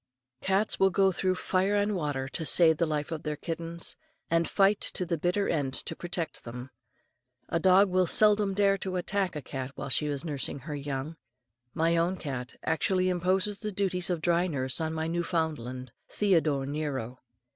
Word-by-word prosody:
Cats 195 +3 +1
will 195 - +5
go 195 0 +3
through 185 0 0
fire 190 +2 0
and 205 0 +1
water 145 -6 -2
to 160 - -1
save 160 0 +5
the 170 - +1
life 150 +1 -2
of 160 -2 -3
their 150 -1 -3
kittens, 165 +2 -4 0.4
and 165 0 +2
fight 200 +1 +3
to 180 - -1
the 170 0 -1
bitter 180 +5 0
end 140 -5 -1
to 165 - -2
protect 175 -3 -3
them. 125 +2 -8 0.8
A 170 - +1
dog 190 +3 +5
will 185 -1 +3
seldom 210 0 +4
dare 195 -1 +3
to 185 -1 -4
attack 185 0 -1
a 150 - -5
cat 130 0 -5
while - - -5
she 150 +3 +1
is 145 +1 -3
nursing 145 -3 -2
her 150 +4 -6
young. 145 +2 -4 0.6
My 165 +1 +2
own 175 +3 +1
cat 130 -6 -5
actually 185 +3 +1
imposes 185 +3 +1
the 210 -1 -4
duties 185 -2 -1
of 175 -3 -1
dry 175 +1 +2
nurse 130 -3 0
on 160 0 -1
my 160 0 -2
Newfoundland, 160 -7 -2 0.2
"Theodore 160 -9 +1
Nero." 135 -4 -4
170 Hz, 180 wpm, -29 LUFS, 145-185 Hz, 0.8 s, will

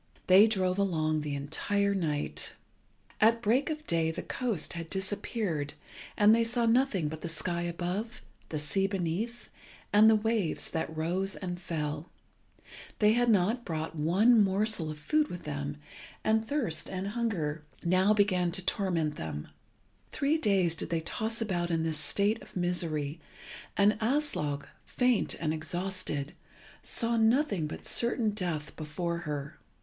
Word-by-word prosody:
They 195 +4 +8
drove 190 -3 0
along 155 -5 +1
the 150 -1 -3
entire 200 +8 0
night. 155 -6 -2 0.6
At 230 +2 +5
break 250 +8 +2
of 305 -1 -4
day 165 -1 +1
the 160 - -4
coast 230 - -1
had 165 -1 -6
disappeared, 190 -5 -2 0.4
and 210 +1 +6
they 230 0 +4
saw 235 +1 0
nothing 230 - +2
but 155 +1 -6
the 170 - -3
sky 170 +1 -1
above, 180 +7 -3 0.3
the 155 - -3
sea 150 +7 +1
beneath, 195 +5 -3 0.4
and 215 +2 +8
the 220 - +6
waves 215 -5 0
that 160 -1 -3
rose 185 +5 -1
and 180 -2 -5
fell. 150 -2 -3 0.9
They 210 0 +5
had 240 +1 +2
not 220 +4 +2
brought 160 -3 -4
one 200 +9 +4
morsel 195 -3 +1
of 155 - -6
food 300 - +1
with 175 - -7
them, 145 0 -4 0.5
and 220 +1 +2
thirst 265 - -1
and 190 +1 -3
hunger 185 -10 -2 0.2
began 185 0 +3
now - - -1
to 190 - -1
torment 170 -7 0
them. 75 -2 -5 0.6
Three 295 +3 +1
days 195 - +2
did - - -4
they 165 -1 0
toss 220 +7 -3
about 175 -5 -1
in 165 -1 0
this 160 -2 0
state 200 +9 +1
of - - -15
misery, 165 -4 -1 0.6
and 205 +1 +4
Aslog, 220 - 0 0.2
faint 250 -3 +1
and 155 -2 -1
exhausted, 160 -2 -2 0.5
saw 230 -1 0
nothing 225 - +2
but - - -8
certain 235 -2 +1
death 175 -7 -3
before 170 +2 -3
her. 145 0 -5
185 Hz, 150 wpm, -30 LUFS, 160-220 Hz, 0.9 s, They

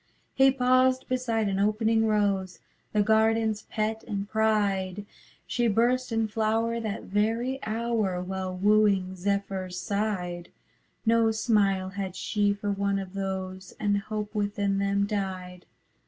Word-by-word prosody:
He 270 0 +5
paused 255 0 +3
beside 235 -4 0
an 195 -1 -1
opening 220 +2 +2
rose, 200 -3 0 0.3
The 210 -1 +2
gardenâs 220 0 +2
pet 220 0 -2
and 200 -3 -3
pride; 205 -3 0 0.4
She 240 -1 0
burst 240 +4 +2
in 225 -1 +1
flower 225 +2 0
that 220 -1 -4
very 225 +6 0
hour, 220 -5 -1
While 185 0 -4
wooing 200 -2 +3
zephyrs 190 -1 -2
sighed; 185 -4 -2 0.6
No 230 0 +4
smile 205 -4 +1
had 190 -1 -5
she 205 -2 +1
for 205 0 -2
one 200 0 0
of 190 -1 -6
those, 190 -1 -5
And 205 -1 +1
hope 210 +1 -5
within 205 -1 0
them 200 0 +1
died. 185 -3 -4
205 Hz, 130 wpm, -27 LUFS, 195-225 Hz, 0.6 s, He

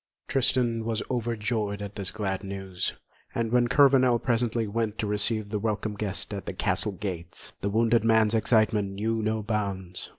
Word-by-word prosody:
Tristan 120 -3 +1
was 115 -1 -1
overjoyed 110 -3 -1
at 100 -1 -6
this 100 -2 0
glad 95 -2 -3
news, 95 -2 -4 0.4
and 115 -1 -1
when 120 0 +4
Kurvenal 130 -2 +5
presently 115 -1 0
went 110 0 -2
to - - -1
receive 105 +1 0
the 105 0 -1
welcome 110 0 -1
guest 100 0 -3
at 100 - -6
the - - -3
castle 105 - -1
gates, 90 -4 -5
the 100 - 0
wounded 115 +2 +3
man's 110 -1 +4
excitement 110 -3 +2
knew 110 +3 -1
no 110 0 -1
bounds. 100 -4 -3
110 Hz, 165 wpm, -27 LUFS, 100-115 Hz, 0.4 s, Kurvenal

